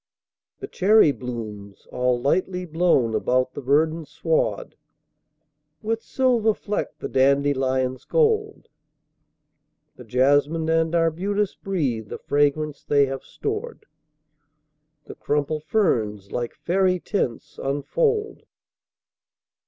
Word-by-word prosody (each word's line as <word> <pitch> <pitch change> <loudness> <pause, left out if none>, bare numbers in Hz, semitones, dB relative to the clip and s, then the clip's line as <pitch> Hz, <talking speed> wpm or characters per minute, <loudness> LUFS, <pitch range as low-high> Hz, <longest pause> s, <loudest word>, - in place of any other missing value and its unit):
The - - -5
cherry 200 -4 +4
blooms, 110 -6 -8
all 125 -1 +1
lightly 180 +7 0
blown 160 -8 +2
about 130 +2 +1
the - - -6
verdant 155 +4 +1
sward, 165 -1 -1 1.1
With 225 +1 -1
silver 235 -5 +1
fleck 205 0 -4
the - - -5
dandelion's 130 -1 +1
gold; 440 -2 +1 1.3
The 125 - -10
jasmine 145 +7 +2
and 165 +1 +1
arbutus 185 +5 0
breathe 135 - -2
the - - -5
fragrance 145 +1 0
they 140 -1 +3
have 135 0 -5
stored; 435 +1 -5 1.2
The - - -9
crumpled 150 +1 -2
ferns, 105 - 0
like 120 -1 -3
faery 185 0 +1
tents, 165 - -3
unfold. 430 - -1
150 Hz, 100 wpm, -23 LUFS, 130-195 Hz, 1.3 s, cherry